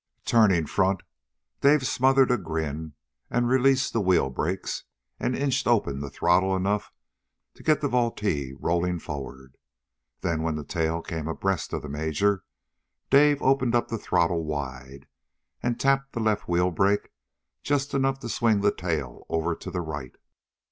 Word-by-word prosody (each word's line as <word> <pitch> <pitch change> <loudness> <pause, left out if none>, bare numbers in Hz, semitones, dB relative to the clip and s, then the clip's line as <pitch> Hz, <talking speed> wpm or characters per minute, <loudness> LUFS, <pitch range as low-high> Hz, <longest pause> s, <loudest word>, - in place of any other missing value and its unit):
Turning 100 -8 +4
front, 95 +3 +1 0.6
Dave 140 -1 +4
smothered 130 +1 +3
a 125 - +3
grin 80 -2 -4 0.4
and 120 0 +1
released 130 +2 +3
the 115 - +1
wheel 90 -8 +2
brakes, 90 +8 -3 0.3
and 125 - 0
inched 140 -1 0
open 100 -13 +2
the 70 0 -5
throttle 95 +5 +2
enough 100 +2 -1 0.6
to - - -17
get 155 -1 +2
the 145 - +1
Vultee 105 - 0
rolling 85 +1 0
forward. 65 -3 -8 0.6
Then 80 -3 -1
when 80 -1 -1
the 75 - -4
tail 80 0 -1
came 80 -2 -4
abreast 95 +2 -2
of - - -3
the - - -6
major, 80 +7 0 0.7
Dave 145 +1 +5
opened 130 -2 +3
up 120 - +1
the 115 - -3
throttle 85 -3 +1
wide 70 -2 -6 0.6
and 120 -1 -1
tapped 135 0 +1
the 115 - -3
left 110 -2 0
wheel 90 +1 +2
brake 100 +4 +1 0.5
just 145 0 -1
enough 135 0 +1
to 120 - -5
swing 110 -3 +2
the 100 0 +3
tail 80 -8 -4
over 80 +1 0
to - - -8
the 90 - -3
right. 70 -6 -6
95 Hz, 155 wpm, -26 LUFS, 80-120 Hz, 0.7 s, Dave